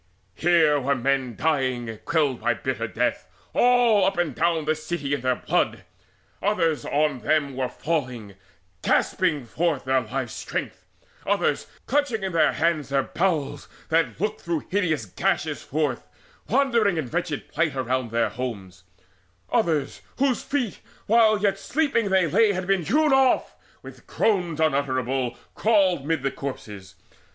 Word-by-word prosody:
Here 160 - +3
were 140 +1 +1
men 130 -3 -1
lying 130 -7 -1
quelled 145 -6 +1
by - - +1
bitter - - -3
death - - -1 0.3
All 240 -4 +4
up 195 0 +1
and 175 -5 0
down 165 +2 +1
the 155 - +2
city 155 -2 -4
in 140 - -1
their 130 0 +1
blood; - - -1 0.6
Others 165 -7 +1
on 145 -2 +1
them 145 -1 0
were 130 -1 -1
falling, 125 -11 -3 0.5
gasping 165 -9 +1
forth 155 +2 -1
Their 130 0 +2
life's 110 -3 -4
strength; - - -5 0.4
others, - - 0 0.2
clutching 265 -6 0
in 190 - -2
their 165 -2 +3
hands 160 -4 0
Their 135 -1 +1
bowels 155 -5 -1 0.2
that 165 0 +1
looked 210 +3 -2
through 170 -3 -3
hideous 165 - 0
gashes 95 - -1
forth, 145 -4 -2 0.4
Wandered 240 -3 +3
in 155 -5 -2
wretched 165 0 -3
plight 160 -1 -1
around 130 -1 -1
their 115 +1 +1
homes: 95 -8 -6 0.7
Others, 150 -5 0 0.2
whose 265 -2 +1
feet, 255 -7 -2 0.3
while 220 -1 +5
yet 205 -1 +2
asleep 290 +8 -1
they 190 -5 +3
lay, 205 +7 +3
Had 185 0 -3
been 195 -1 +2
hewn 295 - +3
off, 265 -1 +3 0.3
with - - -13
groans 180 -7 0
unutterable 135 -4 0 0.2
Crawled 190 -9 +2
mid 160 -4 0
the 135 - 0
corpses. 105 -8 -7
155 Hz, 145 wpm, -24 LUFS, 130-195 Hz, 0.7 s, while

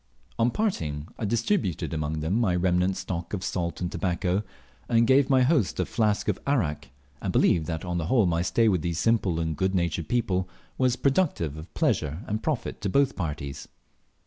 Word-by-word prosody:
On 115 +1 +4
parting, 80 - -2
I 115 - -1
distributed 110 - 0
among 75 0 -2
them 95 +9 +1
my 95 -6 +2
remnant 90 +1 +1
stock 85 0 -5
of 95 - -5
salt 85 -1 -3
and 90 0 -2
tobacco, 90 +1 0 0.5
and 115 -1 +4
gave 130 +2 +4
my 130 -2 +5
host 130 - +2
a - - +2
flask 105 -3 0
of - - 0
arrack, 85 - 0 0.3
and - - -2
believe 80 -3 +3
that 80 0 -3
on 90 -1 -2
the 80 - -3
whole 115 -1 +4
my 85 -1 +1
stay 115 +5 +2
with 95 -6 +2
these 85 0 -2
simple 95 -3 +2
and 80 -1 -1
good 95 +4 0
natured 85 -2 -1
people 95 -7 0 0.3
was 130 -1 +2
productive 135 - +1
of 80 +2 -10
pleasure 75 +5 0
and 110 +1 -2
profit 155 -6 -2
to 100 - -1
both 140 +5 +2
parties. 75 -6 -4
95 Hz, 190 wpm, -26 LUFS, 85-115 Hz, 0.5 s, my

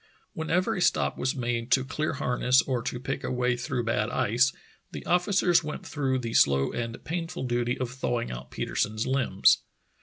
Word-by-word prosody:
Whenever 180 +7 0
a 180 - -2
stop - - +2
was 130 - -1
made 120 -1 -2
to 130 0 +3
clear 155 +2 -2
harness 125 -1 +2
or 125 -3 -1
to 125 - -4
pick 135 +2 -4
a - - -2
way 125 0 +1
through 120 0 -2
bad 110 -2 0
ice, 120 +5 +2 0.4
the - - -7
officers 180 -1 +3
went 150 0 -6
through 135 -3 -1
the 115 -3 -4
slow 70 0 +4
and 115 -1 -5
painful 170 0 -4
duty 120 -1 0
of 125 -2 -3
thawing 120 -2 -2
out 60 +2 -7
Petersen's 110 +1 -2
limbs. 130 -7 +3
125 Hz, 180 wpm, -27 LUFS, 120-150 Hz, 0.4 s, slow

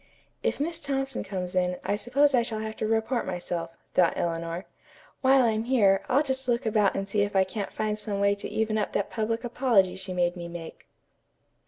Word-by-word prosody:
"If - - -1
Miss 330 +3 -2
Thompson 270 -2 -1
comes 185 -2 -4
in, 180 -1 +1
I 205 - 0
suppose 275 +6 +2
I 250 - +5
shall 230 -1 -3
have 220 0 -4
to 220 - -1
report 225 +3 +1
myself," 175 -2 -4 0.2
thought 175 -2 +4
Eleanor. 170 +1 -2 0.6
"While 265 0 +5
I'm 220 -1 +1
here, 205 -7 +4
I'll 280 +4 +4
just 265 -2 -2
look 235 -1 +1
about 210 -2 +2
and 195 0 -2
see 205 +1 +1
if 205 0 -1
I 190 - +6
can't 200 +1 -5
find 215 0 -2
some 205 -1 -3
way 200 0 +4
to 200 - -6
even 220 0 0
up 210 - -2
that 200 - -1
public 225 +1 -1
apology 235 -7 +2
she 190 0 -6
made 175 0 +1
me 170 -1 -6
make." 170 -1 -9
210 Hz, 205 wpm, -27 LUFS, 185-240 Hz, 0.6 s, I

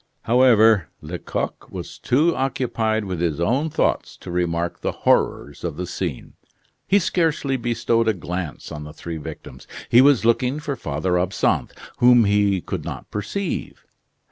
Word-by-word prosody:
However, 115 - +5
Lecoq 85 +3 -4
was - - -8
too 155 +7 +2
occupied 115 -5 -1
with 90 -3 -4
his 85 -4 0
own 130 - +1
thoughts 155 - -1
to - - -9
remark 85 -1 -1
the - - -1
horrors 70 0 +1
of 85 -4 -4
the 90 - -3
scene. 90 -5 -5 0.5
He 200 - +4
scarcely 165 -7 +1
bestowed 115 -1 0
a 110 - +4
glance 90 -2 -5
on 75 - -6
the 75 0 -9
three 85 +1 -6
victims. 75 - -9 0.2
He 120 - +7
was 135 -4 +4
looking 125 +4 +2
for 150 -2 -3
Father 90 - -1
Absinthe, 90 +2 0 0.2
whom 120 -1 +6
he 100 -2 +2
could - - -5
not - - -7
perceive. 135 - -4
110 Hz, 150 wpm, -22 LUFS, 85-130 Hz, 0.5 s, He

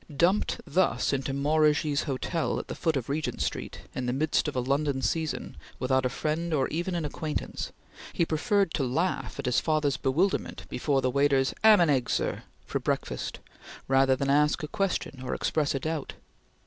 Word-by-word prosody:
Dumped 180 +6 +2
thus 150 -6 +1
into 135 0 -1
Maurigy's 150 +1 +2
Hotel 155 +4 -1
at - - -6
the - - -3
foot 160 -4 0
of 125 - -4
Regent 150 +2 -2
Street, - - -3
in 125 -1 -3
the 125 - 0
midst 150 +3 +1
of 150 - -3
a - - +1
London 140 +2 0
season, 160 -2 -2 0.2
without 130 0 +1
a - - -4
friend 155 +5 -1
or 135 -3 +2
even 175 +3 -2
an 170 -3 -1
acquaintance, 150 +1 -4 0.4
he 170 - +1
preferred 195 +3 +1
to 140 - 0
laugh 160 +9 -1
at - - -4
his 125 -1 +3
father's 155 -3 +1
bewilderment 165 +9 0
before 135 +1 0
the 130 - +2
waiter's 140 0 +2
"'amhandheggsir" 170 - +4 0.2
for - - -2
breakfast, - - -2 0.5
rather 135 0 +4
than 140 +1 0
ask 150 +3 +3
a - - -2
question 180 -7 -2
or 130 - -3
express 150 -3 0
a - - 0
doubt. 155 0 -3
150 Hz, 175 wpm, -28 LUFS, 135-160 Hz, 0.5 s, amhandheggsir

